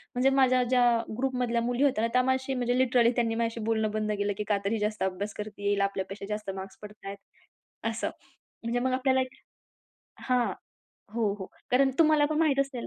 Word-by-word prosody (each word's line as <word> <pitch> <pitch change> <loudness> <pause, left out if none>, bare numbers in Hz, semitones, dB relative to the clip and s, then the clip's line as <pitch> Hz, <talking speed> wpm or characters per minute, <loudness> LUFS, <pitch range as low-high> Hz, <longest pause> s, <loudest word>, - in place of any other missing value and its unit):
म्हणजे 260 +2 +4
माझ्या 255 -1 +4
ज्या 245 0 +3 0.3
ग्रुपमधल्या 250 -3 0
मुली 245 +3 0
होत्या 265 -6 +2
ना, - - +2
त्या 250 - +5
माझ्याशी 260 +1 0
म्हणजे 245 0 0
लिटरली 245 -2 +4
त्यांनी 230 -2 +1
माझ्याशी 230 0 -1
बोलणं 220 -1 +1
बंद 215 0 -1
केलं 205 0 0
की 210 - -2
का 205 - +3
तर 200 - +1
ही 225 - 0
जास्त 210 -1 -1
अभ्यास 190 +2 -2
करतीये, 205 -1 -4
हिला 200 -1 +2
आपल्यापेक्षा 195 0 -4
जास्त 210 -1 -4
मार्क्स 190 0 -8
पडतायेत 205 -1 -9 0.7
असं. - - -2 0.5
म्हणजे 235 +1 0
मग 255 +1 0
आपल्याला 260 0 +2
एक 255 0 -5 0.9
हां, 245 -5 +1 0.6
हो, 220 -4 +1
हो. 190 - -6 0.2
कारण 265 +2 +4
तुम्हाला 310 -2 +5
पण 310 0 -1
माहीत 295 -4 +3
असेल 270 -3 -3
235 Hz, 190 wpm, -28 LUFS, 210-260 Hz, 0.9 s, त्या